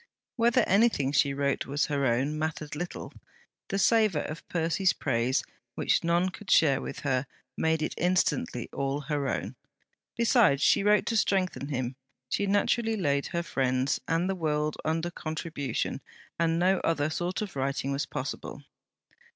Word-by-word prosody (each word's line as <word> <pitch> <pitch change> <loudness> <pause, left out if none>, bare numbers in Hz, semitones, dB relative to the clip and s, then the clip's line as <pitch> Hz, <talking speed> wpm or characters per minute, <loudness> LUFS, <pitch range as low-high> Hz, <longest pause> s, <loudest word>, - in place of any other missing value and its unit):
Whether 235 -1 +3
anything 195 - +3
she 140 -1 +3
wrote 140 0 -1
was 145 +2 0
her 140 -2 0
own, 135 +6 0
mattered 155 -1 -3
little: 175 +3 -6 0.5
the 195 - -2
savour 210 -6 +3
of 155 +2 -8
Percy's 170 +2 +1
praise, 125 -1 0 0.3
which - - +1
none 170 +2 +2
could 195 +2 -11
share 140 -4 +4
with - - -6
her, 135 -2 0 0.3
made 160 -1 +1
it - - -2
instantly 160 -8 0
all 140 +1 -2
her 145 -2 -2
own. - - -3 0.6
Besides 230 - +4
she 205 - +4
wrote 210 0 +4
to 230 - -1
strengthen 190 -9 +1
him; 130 -2 -3 0.3
she 200 - 0
naturally 220 +3 +1
laid 140 -6 0
her 170 0 -2
friends 130 -3 0
and 165 +2 +1
the 195 - 0
world 155 -3 -1
under 165 +2 -1
contribution; 155 -6 -3 0.4
and 165 -1 +2
no 185 +2 +3
other 155 -2 0
sort 175 +5 -2
of 195 -6 -8
writing 135 0 -1
was 140 0 -2
possible. 140 +2 -5
155 Hz, 155 wpm, -28 LUFS, 140-185 Hz, 0.6 s, share